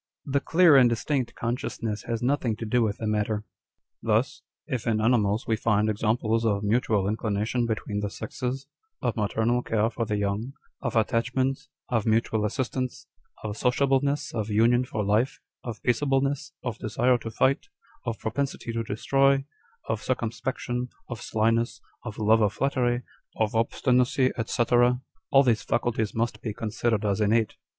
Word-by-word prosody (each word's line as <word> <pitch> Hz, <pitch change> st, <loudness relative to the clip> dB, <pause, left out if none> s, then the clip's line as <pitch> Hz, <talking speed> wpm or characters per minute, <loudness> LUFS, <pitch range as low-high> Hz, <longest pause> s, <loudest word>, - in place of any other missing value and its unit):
â€" -, -, -4 dB
[The 140 Hz, -, +3 dB
clear 165 Hz, +1 st, +5 dB
and 125 Hz, -2 st, +7 dB
distinct 125 Hz, +2 st, -1 dB
consciousness 115 Hz, -2 st, -3 dB
has 115 Hz, 0 st, -2 dB
nothing 125 Hz, -4 st, +1 dB
to 115 Hz, -, -6 dB
do 120 Hz, +3 st, +2 dB
with 110 Hz, -1 st, 0 dB
the 115 Hz, -, -4 dB
matter.] 105 Hz, 0 st, 0 dB
â€" -, -, -24 dB, 0.3 s
" -, -, -59 dB
Thus, 130 Hz, +7 st, +1 dB, 0.2 s
if 130 Hz, -6 st, -3 dB
in 110 Hz, -2 st, +2 dB
animals 110 Hz, -2 st, +2 dB
we 110 Hz, -, +1 dB
find 105 Hz, -1 st, +2 dB
examples 110 Hz, +1 st, 0 dB
of 105 Hz, -2 st, +1 dB
mutual 105 Hz, -1 st, +2 dB
inclina 105 Hz, 0 st, -1 dB
tion 120 Hz, +1 st, 0 dB
between 105 Hz, -2 st, -2 dB
the 105 Hz, 0 st, -2 dB
sexes, 130 Hz, +5 st, -4 dB, 0.4 s
of -, -, 0 dB
maternal 115 Hz, +3 st, +1 dB
care 110 Hz, -1 st, 0 dB
for 115 Hz, -, -2 dB
the 105 Hz, -2 st, 0 dB
young, 105 Hz, +6 st, -2 dB, 0.3 s
of 120 Hz, -3 st, -3 dB
attachment, 125 Hz, +4 st, +1 dB, 0.3 s
of 115 Hz, -3 st, 0 dB
mutual 110 Hz, -1 st, +2 dB
assistance, 130 Hz, +2 st, -3 dB, 0.4 s
of 105 Hz, -1 st, -3 dB
sociableness, 140 Hz, +4 st, +1 dB
of 110 Hz, -2 st, -2 dB
union 120 Hz, +4 st, +3 dB
for 105 Hz, -4 st, -3 dB
life, 120 Hz, +7 st, +1 dB, 0.2 s
of 115 Hz, -3 st, -7 dB
peaceableness, 135 Hz, +2 st, +1 dB
of 120 Hz, -3 st, -4 dB
desire 120 Hz, +3 st, +2 dB
to 115 Hz, -, -6 dB
fight, 130 Hz, +5 st, +1 dB, 0.4 s
of 115 Hz, -3 st, -3 dB
propensity 130 Hz, 0 st, -3 dB
to 115 Hz, -, -1 dB
destroy, 135 Hz, +5 st, +2 dB, 0.4 s
of 110 Hz, -1 st, -1 dB
circumspection, 125 Hz, 0 st, -2 dB, 0.2 s
of 120 Hz, -2 st, -6 dB
slyness, 115 Hz, +2 st, +1 dB, 0.3 s
of 110 Hz, -3 st, -6 dB
love 110 Hz, +1 st, +4 dB
of 105 Hz, -1 st, +2 dB
flattery, 125 Hz, 0 st, 0 dB, 0.3 s
of 110 Hz, -1 st, 0 dB
obstinacy, 125 Hz, +3 st, +2 dB, 0.2 s
&c., 120 Hz, -, +1 dB, 0.7 s
all 135 Hz, -1 st, +6 dB
these 115 Hz, -4 st, +2 dB
faculties 115 Hz, -3 st, -1 dB
must 115 Hz, +1 st, -1 dB
be 110 Hz, -3 st, -4 dB
considered 110 Hz, 0 st, -1 dB
as 100 Hz, +1 st, +1 dB
innate." 110 Hz, +1 st, +2 dB
115 Hz, 160 wpm, -26 LUFS, 110-125 Hz, 0.7 s, and